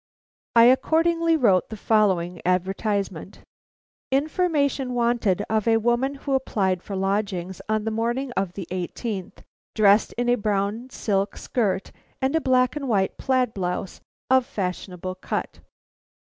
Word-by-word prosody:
I 230 - +8
accordingly 330 +6 +3
wrote 195 - +3
the 220 - -7
following 190 -6 +1
advertisement: 190 +1 -1 0.7
"Information 280 -3 0
wanted 235 -5 +1
of 220 0 0
a 225 -1 +5
woman 240 +5 +1
who 275 0 -4
applied 195 -9 0
for 200 - -6
lodgings 190 -2 -2
on 215 0 +1
the 225 - -2
morning 240 +4 -1
of 195 -6 -2
the 190 -3 -7
eighteenth 185 +2 -4
inst., - - -25 0.3
dressed 210 0 +4
in 245 0 -2
a 245 0 +3
brown 210 +4 -1
silk 200 -5 -1
skirt 200 -6 -1 0.3
and 265 +3 0
a 320 - +2
black 255 -1 +2
and 280 -3 -4
white 195 -4 0
plaid 255 -3 +1
blouse 180 0 -4 0.3
of 260 -1 +3
fashionable 185 -5 -4
cut. 185 - -4
220 Hz, 140 wpm, -24 LUFS, 190-255 Hz, 0.7 s, I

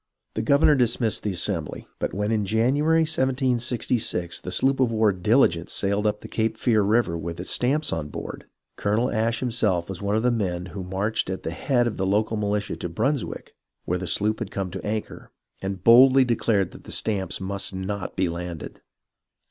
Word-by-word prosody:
The 110 - -2
gov 140 +6 +3
ernor 150 - +6
dismissed 120 -3 +1
the 105 - -2
Assembly; 85 -3 -2
but - - -2
when 105 +2 -2
in 110 -2 +1
January, 135 +10 +2
1766, 125 - 0
the 90 - -6
sloop 135 +6 +2
of 125 -3 +3
war 110 -2 +3
Diligence 90 -3 +2
sailed 100 +2 +1
up 105 0 -1
the - - -8
Cape 110 0 -1
Fear 110 -4 +2
River 105 -3 +2
with 85 +1 -5
its 90 - -2
stamps 145 +5 +1
on 75 -2 -3
board, - - -7 0.3
Colonel 110 +5 0
Ashe 115 +1 0
himself 105 -9 0
was 95 -1 -6
one 100 +1 0
of 110 - +1
the 125 - +3
men 90 -6 -2
who 100 - -5
marched 95 +3 -1
at 95 - -4
the 80 - -3
head 120 +7 +1
of 120 - -2
the 95 - -1
local 105 +3 +1
militia 105 -1 -2
to 90 - -5
Brunswick, 135 - -2 0.3
where 90 +1 -1
the 95 - -5
sloop 105 +6 0
had 115 -5 -4
come 95 -3 -4
to 95 - -6
anchor, 105 +1 -4 0.3
and 95 -1 -4
boldly 130 +4 +7
declared 115 -5 +1
that - - -14
the - - -9
stamps 95 -5 -1
must 95 +1 -2
not 95 +1 -4
be 95 -1 +1
landed. 85 -1 -6
105 Hz, 195 wpm, -24 LUFS, 95-120 Hz, 0.3 s, boldly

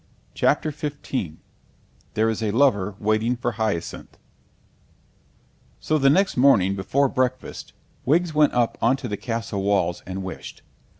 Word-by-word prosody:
CHAPTER 155 - +1
XV 140 - -4 0.8
THERE 110 +1 +2
IS 110 - -4
A 110 - 0
LOVER 105 -5 +2
WAITING 110 +3 +1
FOR 120 0 -2
HYACINTH 110 -6 -4 1.6
So 155 0 0
the 135 0 +5
next 190 +7 +3
morning 115 -8 +4
before 135 +9 +1
breakfast 130 0 -3 0.3
Wiggs 165 +4 +2
went 150 -1 +4
up 120 -2 +1
on 125 +4 +3
to 135 - -6
the 105 - -3
castle 115 -2 -3
walls 95 -3 +1
and 95 +1 -5
wished. 95 - -8
115 Hz, 135 wpm, -23 LUFS, 100-140 Hz, 1.6 s, the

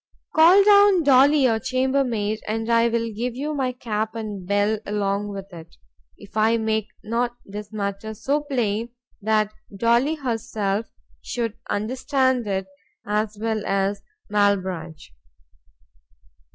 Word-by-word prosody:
—Call 345 +5 +7
down 405 -3 +6
Dolly 280 +1 +5
your 225 -3 +3
chamber 260 +2 +1
maid, 215 -3 -2
and 225 +2 -2
I 230 0 +4
will 230 -1 -1
give 240 +3 -3
you 295 +4 -3
my 265 -3 -1
cap 220 -3 -3
and 210 -5 -6
bell 205 +2 +1
along 205 0 -1
with 195 -1 -8
it, 165 0 -12 0.4
if 205 0 -15
I 220 +1 +3
make 220 -1 -1 0.2
not 240 +2 -1
this 205 +1 -8
matter 205 +1 -4
so 285 +7 0
plain 235 -6 -1 0.3
that 215 0 +1 0.2
Dolly 235 +8 +2
herself 225 -6 -2 0.3
should 230 -3 -3 0.2
understand 260 +2 0
it 190 -1 -1 0.4
as 210 0 -1
well 220 -1 -1
as 195 0 0 0.3
_Malbranch. 185 -6 0
220 Hz, 130 wpm, -23 LUFS, 205-255 Hz, 0.4 s, Call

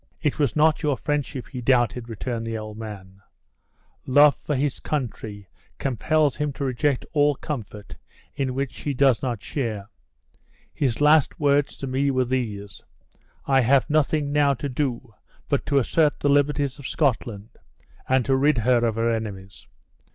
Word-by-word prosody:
"It 150 -1 -1
was 145 -4 +1
not 155 +1 +3
your 145 -5 0
friendship 145 -3 -3
he 125 -3 -6
doubted," 120 -1 +1
returned 115 +1 -4
the 115 0 -3
old 110 -1 -7
man, 100 -3 -9 0.9
"love 145 +2 +6
for 150 - -3
his 135 0 -1
country 110 -8 -4 0.3
compels 145 +3 +1
him 150 -1 -1
to 140 - -5
reject 130 +1 0
all 145 -1 +3
comfort 110 -8 -7 0.4
in 130 -2 -2
which 135 -1 -2
she 145 -2 -4
does 130 -4 +3
not 120 -5 -3
share. 110 -7 -4 0.8
His 130 -2 -1
last 150 0 +4
words 145 -1 +2
to - - -5
me 135 +2 0
were 130 -2 +1
these: 110 -6 -4 0.6
'I 135 -1 +4
have 130 +4 +3
nothing 150 -1 +1
now 145 -1 +3
to 125 +4 -4
do 125 -3 -3 0.3
but - - -1
to 140 - +2
assert 150 +3 +2
the 145 - +1
liberties 145 -1 +1
of 140 - -6
Scotland, 115 -7 -1 0.6
and 130 -2 +3
to 135 - +2
rid 145 +1 +3
her 120 +1 +2
of 115 -2 +1
her 115 +1 +1
enemies. 100 -4 -6
130 Hz, 160 wpm, -24 LUFS, 115-145 Hz, 0.9 s, love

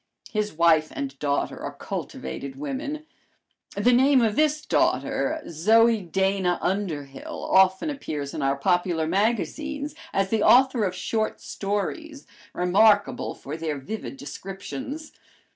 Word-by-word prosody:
His 210 -1 -1
wife 160 -1 +3
and 140 -1 -5
daughter 140 -1 -1
are - - -5
cultivated 135 - -6
women. 150 - -4 0.7
The 205 +5 +3
name 265 +2 +5
of 220 -2 +1
this 305 +1 +1
daughter, 315 - +1
Zoe 220 +7 +4
Dana 190 0 0
Underhill, 160 -8 -3
often 190 +9 +4
appears 150 - -5
in - - -4
our 135 0 +2
popular 175 +1 +1
magazines 280 - -1 0.2
as 195 0 0
the 225 - +2
author 255 -3 +5
of 185 -1 -2
short 215 +4 -2
stories, 275 - -4 0.3
remarkable 205 +3 +3
for 145 - -7
their 160 -2 -3
vivid 135 - -6
descriptions. 265 - -7
195 Hz, 125 wpm, -25 LUFS, 160-240 Hz, 0.7 s, name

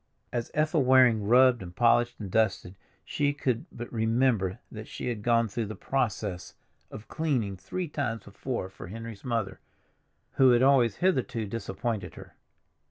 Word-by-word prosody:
As 120 -1 -2
Ethel 155 0 +2
Waring 125 -5 +4
rubbed 125 +1 +5
and 90 -1 -9
polished 120 +2 +3
and 100 -4 -6
dusted 105 -4 0 0.3
she 145 -1 0
could 125 -4 -2
but 120 +1 -8
remember 110 -4 +1
that - - -8
she - - -5
had 115 -4 -4
gone 115 +1 +2
through 110 +1 -3
the 110 - -6
process 105 -8 -3 0.3
of 110 - -10
cleaning 130 -11 -1
three 130 - -5
times 130 -7 -3
before 105 +1 -5
for 95 - -11
Henry's 115 +1 -8
mother, 115 -6 -2 0.8
who 130 -1 +6
had 120 +1 +4
always 130 -5 +4
hitherto 130 -10 0
disappointed 105 -1 -4
her. - - -12
115 Hz, 155 wpm, -28 LUFS, 105-130 Hz, 0.8 s, who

